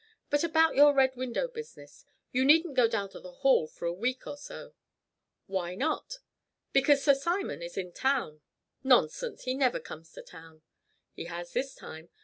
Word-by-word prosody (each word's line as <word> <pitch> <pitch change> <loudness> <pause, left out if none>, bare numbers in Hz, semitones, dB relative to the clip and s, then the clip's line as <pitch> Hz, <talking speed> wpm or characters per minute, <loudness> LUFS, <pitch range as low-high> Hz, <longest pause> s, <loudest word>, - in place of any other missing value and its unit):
But 290 +1 +2
about 320 -1 +3
your 290 +1 +6
Red 265 -1 +3
Window 255 - -2
business 460 -1 -11 0.3
you 255 +1 +1
needn't 315 +3 +5
go 250 -3 +4
down 215 -4 -2
to - - -11
the 180 - -11
Hall 265 - +2
for - - -9
a 170 - 0
week 250 +8 -3
or - - -6
so." 285 - -10 0.7
"Why 180 -2 -3
not?" 315 - -2 0.6
"Because 275 +1 +4
Sir 285 - +6
Simon 340 - -2
is 170 0 -8
in 180 -2 -4
town." 250 - -1 0.4
"Nonsense. - - +2
He 255 - -1
never 260 -2 +1
comes 160 +1 -11
to - - -10
town." 160 -2 -15 0.5
"He - - -7
has 175 0 -7
this 270 0 -2
time. 160 +1 -11
260 Hz, 175 wpm, -29 LUFS, 180-290 Hz, 0.7 s, your